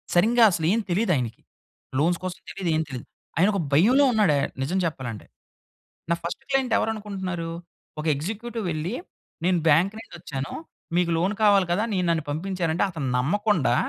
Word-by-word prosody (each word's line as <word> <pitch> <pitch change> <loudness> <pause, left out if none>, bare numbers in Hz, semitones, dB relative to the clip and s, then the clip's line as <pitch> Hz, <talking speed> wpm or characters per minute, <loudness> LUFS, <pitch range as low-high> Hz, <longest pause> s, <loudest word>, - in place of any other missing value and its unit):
సరింగా 230 +7 +5
అసలు 165 -3 -1
ఏం 230 - +2
తెలీదు. 195 +3 +2
ఆయనకి 120 -4 -3 0.6
లోన్స్ 170 +3 +2
కోసం 185 -2 -4
తెలియదు, 190 -3 -3
ఏం 155 - +2
తెలీదు. 125 -3 -6 0.3
ఆయన 180 +5 +5
ఒక 200 - 0
భయంలో 240 - +5
ఉన్నాడు, 210 -8 +4
ఆహ్, 140 - 0
నిజం 170 +8 -1
చెప్పాలంటే. 130 -9 -4 0.9
నా - - +4
ఫస్ట్ 170 +10 -4
క్లయింట్ 265 -3 +1
ఎవరు 225 - +1
అనుకుంటున్నారు? 190 -5 -4 0.5
ఒక - - -8
ఎగ్జిక్యూటివ్ 220 +8 -4
వెళ్లి, 160 +7 -2 0.5
నేను 180 -1 +3
బ్యాంక్ 170 +7 +4
నుండొచ్చాను. 145 -9 -6 0.4
మీకు 175 -1 +2
లోన్ 185 +5 +1
కావాలి 200 -3 +5
కదా, 205 +5 +1
నే 190 - +1
నన్ను 165 -2 +1
పంపించారంటే, 170 +1 -1
అతను 150 -6 -3
నమ్మకుండా 180 - +2
180 Hz, 160 wpm, -25 LUFS, 155-205 Hz, 0.9 s, సరింగా